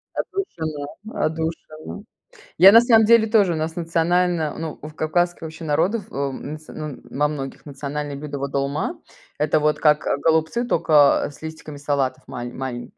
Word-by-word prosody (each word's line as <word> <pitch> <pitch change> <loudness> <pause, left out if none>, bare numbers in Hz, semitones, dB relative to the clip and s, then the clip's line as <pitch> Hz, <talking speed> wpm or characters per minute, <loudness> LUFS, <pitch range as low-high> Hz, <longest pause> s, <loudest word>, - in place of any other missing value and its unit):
Отдушина 160 - -4 0.3
отдушина. 160 +2 -4 0.6
Я 195 +1 +9
на 230 +2 +9
самом 225 -2 +5
деле 230 0 +5
тоже, 210 -5 +3
у - - -2
нас 160 +1 -3
национально, 170 -1 0
ну, 160 -1 -5
у 150 - -7
кавказских 175 +3 -1
вообще 160 0 -8
народов, 180 +8 +1
э, - - -11
м, 140 +1 -3
нац 155 0 -11
ну, 150 -4 -6
во 150 +1 +1
многих, 140 -3 -6
национальное 145 0 -5
блюдо- 145 0 -6
вот 140 0 -3
долма. 140 +1 -2 0.4
Это 155 +1 +2
вот 150 0 +1
как, 150 -1 +3
э, - - +1
голубцы, 160 +10 +1
только 155 -9 +4
с - - -17
листиками 160 -2 -8
салатов 140 -2 -1
мал 120 -1 -6
маленьк 130 - -6
155 Hz, 165 wpm, -22 LUFS, 145-170 Hz, 0.6 s, Я